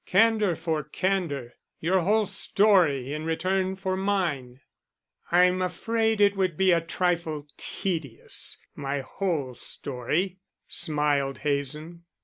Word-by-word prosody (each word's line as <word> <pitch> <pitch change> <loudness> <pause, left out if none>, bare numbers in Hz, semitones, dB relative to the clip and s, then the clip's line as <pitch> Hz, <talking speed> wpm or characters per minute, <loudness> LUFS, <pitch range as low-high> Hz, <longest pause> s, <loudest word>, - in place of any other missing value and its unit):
Candor 215 -2 +4
for 160 -1 -1
candor; 150 -5 -2 0.3
your 185 +4 +2
whole 210 +5 +2
story 175 -12 +3
in 155 +1 -4
return 185 +4 0
for 190 -1 -2
mine." 170 -11 -1 0.7
"I'm 180 +1 +4
afraid 220 +5 0
it 205 0 +5
would 185 -5 0
be 190 -1 +4
a 170 -1 +4
trifle 165 -3 -1
tedious, 160 -11 -3 0.2
my 140 -1 -3
whole 145 -2 -2
story," 150 +10 -3 0.3
smiled 150 -4 0
Hazen. 150 +4 -2
170 Hz, 115 wpm, -26 LUFS, 145-190 Hz, 0.7 s, it